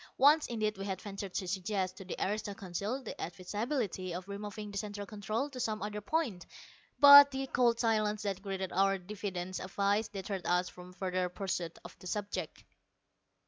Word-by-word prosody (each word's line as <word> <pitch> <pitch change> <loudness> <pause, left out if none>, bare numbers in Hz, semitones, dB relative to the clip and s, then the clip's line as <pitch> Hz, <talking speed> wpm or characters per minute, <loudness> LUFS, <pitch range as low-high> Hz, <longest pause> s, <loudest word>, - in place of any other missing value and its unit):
Once 295 +4 +6
indeed 215 -4 -1
we 195 - -4
had 190 -2 -3
ventured 200 -1 -6
to 185 - -3
suggest 190 0 -1
to 190 - -9
the 185 - -5
aristo 205 0 -3
Council 200 +9 -4
the 220 - -7
advisability 190 - -3
of 180 +1 -6
removing 205 +1 -6
the 200 - -5
Central 205 -1 -5
Control 215 +5 -2
to 255 - -7
some 215 -3 -1
other 210 0 -4
point, 225 - -1 0.6
but 285 0 +11
the 270 0 -3
cold 240 -3 +2
silence 215 -2 +1
that 195 -2 -2
greeted 190 -2 -3
our 195 +1 +3
diffident 185 -1 -5
advice 200 +3 0
deterred 195 -1 -5
us 180 +1 +2
from 180 0 -12
further 185 -1 -1
pursuit 180 -3 -3
of - - -10
the 185 - -9
subject. 195 -4 -4
200 Hz, 175 wpm, -32 LUFS, 185-215 Hz, 0.6 s, but